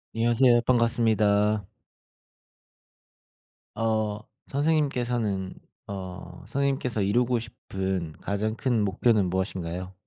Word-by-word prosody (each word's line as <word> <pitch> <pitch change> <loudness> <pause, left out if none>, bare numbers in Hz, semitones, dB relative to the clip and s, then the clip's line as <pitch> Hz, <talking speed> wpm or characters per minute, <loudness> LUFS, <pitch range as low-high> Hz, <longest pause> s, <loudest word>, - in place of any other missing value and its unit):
안녕하세요. 120 +1 +4
반갑습니다. 110 -4 +2 2.1
어 110 -2 0 0.3
선생님께서는 125 -10 0 0.3
어 90 -2 -7
선생님께서 135 -5 -1
이루고 120 +5 +2
싶은 95 -6 -4
가장 105 +2 -1
큰 120 -3 +1
목표는 105 0 +2
무엇인가요? 90 0 -3
110 Hz, 235 characters per minute, -26 LUFS, 95-120 Hz, 2.1 s, 안녕하세요